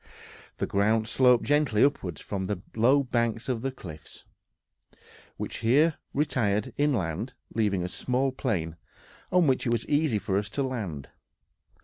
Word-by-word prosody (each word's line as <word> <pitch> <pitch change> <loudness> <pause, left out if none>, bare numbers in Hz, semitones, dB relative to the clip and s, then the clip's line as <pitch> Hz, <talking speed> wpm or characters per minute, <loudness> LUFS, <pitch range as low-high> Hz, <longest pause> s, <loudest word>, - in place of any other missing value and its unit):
The - - -1
ground 110 +2 +1
sloped 125 0 +4
gently 145 -7 +3
upward 95 - 0
from 95 -2 -4
the 100 -1 -2 0.2
low 130 +6 +4
banks 120 -2 -1
of 125 -4 -1
the 135 +1 -2
cliffs, 80 -11 -11 1.1
which - - -5
here 145 +8 +3 0.2
retired 125 -5 0
inland, 120 - -1 0.2
leaving 100 -5 +1
a - - -2
small 130 +7 -1
plain, 90 - -2 0.5
on 180 -1 +4
which 130 -3 +1
it - - +1
was 120 -1 0
easy 145 -6 +2
for 100 -1 0
us 100 0 -5
to 140 - -1
land. 105 - -4
115 Hz, 145 wpm, -27 LUFS, 100-135 Hz, 1.1 s, sloped